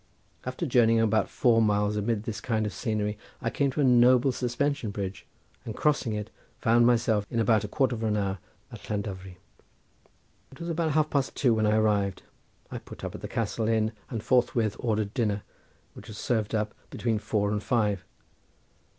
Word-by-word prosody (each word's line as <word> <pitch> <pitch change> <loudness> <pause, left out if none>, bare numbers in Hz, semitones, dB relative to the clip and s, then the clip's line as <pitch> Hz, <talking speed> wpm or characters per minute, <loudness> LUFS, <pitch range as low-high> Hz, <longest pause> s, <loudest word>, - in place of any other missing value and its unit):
After 130 +6 -3
journeying 115 -4 +4
about 110 -1 +2
four 115 -2 +3
miles 105 -1 +2
amid 105 0 -1
this 110 -1 -5
kind 110 -3 0
of 105 - -3
scenery 105 -1 -2 0.2
I 115 - -2
came 140 -1 +1
to 135 - -1
a - - +3
noble 125 +1 +5
suspension 125 0 -1
bridge, 100 -2 -5 0.4
and 110 - -6
crossing 145 -6 +1
it 105 -1 -4 0.3
found 120 +1 +4
myself 115 -3 +2
in 115 - -1
about 110 -2 +3
a - - -3
quarter 130 +3 +1
of 115 - -6
an 110 -2 +1
hour 100 -2 -1 0.3
at - - -11
Llandovery. 95 -3 -4 1.1
It 135 - -15
was 170 - -5
about 165 -2 0
half 155 0 +2
past 140 -2 0
two 125 -4 +3
when 110 -1 +2
I 105 +1 +3
arrived. 100 -3 +1 0.5
I - - -4
put - - -12
up - - -4
at - - -8
the - - -5
Castle 110 0 -2
Inn 110 -1 +2 0.2
and 115 -4 -4
forthwith 120 -4 +2
ordered 110 -3 -1
dinner, 105 -5 0 0.5
which - - -12
was 110 - -9
served 110 -3 -1
up 105 -1 -1 0.2
between 115 -3 -1
four 105 -1 0
and 105 -1 -1
five. 105 -5 0
110 Hz, 185 wpm, -27 LUFS, 105-125 Hz, 1.1 s, noble